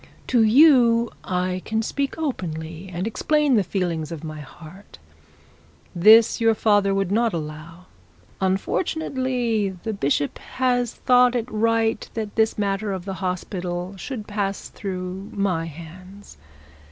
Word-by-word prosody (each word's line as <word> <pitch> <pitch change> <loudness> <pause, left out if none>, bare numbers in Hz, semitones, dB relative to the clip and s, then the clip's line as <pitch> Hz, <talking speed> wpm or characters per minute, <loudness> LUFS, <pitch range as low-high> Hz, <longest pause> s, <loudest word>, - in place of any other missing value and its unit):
'To 245 -2 +2
you 235 -1 +5
I 185 0 -2
can 220 +1 -1
speak 275 +4 -2
openly, 170 - -4
and 180 +2 -3
explain 295 +5 +1
the 210 -4 +4
feelings 170 -4 -2
of 165 -2 -7
my 155 -1 -6
heart. 160 +6 -13 1.0
This 220 +6 +6
your 225 -1 +4
father 205 -2 +3
would 195 -1 -1
not 230 +1 +2
allow. 160 +3 -7 0.6
Unfortunately 235 - -1
the 220 - -2
bishop 145 -5 -1
has 245 -2 0
thought 250 0 +4
it 235 -2 0
right 225 0 0
that 215 -2 -4
this 220 0 +2
matter 200 0 -1
of 185 -1 -6
the 195 - -4
hospital 180 0 -3
should 215 +2 -6
pass 200 -2 -3
through 190 0 -6
my 185 -5 0
hands. 175 - -12
200 Hz, 130 wpm, -23 LUFS, 180-230 Hz, 1.0 s, This